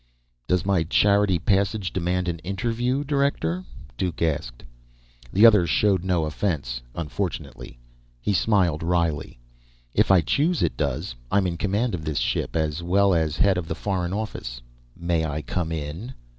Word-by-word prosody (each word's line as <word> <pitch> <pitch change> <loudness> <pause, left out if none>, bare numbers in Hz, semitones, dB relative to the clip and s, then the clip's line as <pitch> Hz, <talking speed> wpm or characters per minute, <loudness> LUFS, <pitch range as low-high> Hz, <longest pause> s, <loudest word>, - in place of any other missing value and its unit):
"Does 90 0 +1
my 95 -3 +2
charity 100 +3 +3
passage 100 0 0
demand 90 0 -1
an 85 -1 -2
interview, 115 - -1
director?" 145 +5 0 0.3
Duke 90 -3 -2
asked. 70 -7 -2 0.7
The 105 +4 +6
other 105 -6 +6
showed 95 +4 +2
no 90 -4 +1
offense, 75 -7 -2
unfortunately. 75 -6 -5 0.4
He 100 - -1
smiled 95 -6 +2
wryly. 85 -5 -1 0.6
"If - - +3
I 95 -3 +6
choose, 150 - +1
it - - 0
does. 75 +4 -2 0.2
I'm 100 -1 +2
in 90 -2 -1
command 105 +6 0
of 85 -3 -3
this 75 -2 -2
ship, - - -1
as 80 0 0
well 95 +3 +3
as 80 -2 0
head 95 -3 +3
of 85 - -6
the 80 - -3
Foreign 90 -1 -2
Office. 95 - -4 0.4
May 85 -1 0
I 75 -1 -3
come 85 -3 -2
in?" 80 - -5
90 Hz, 155 wpm, -24 LUFS, 80-100 Hz, 0.7 s, The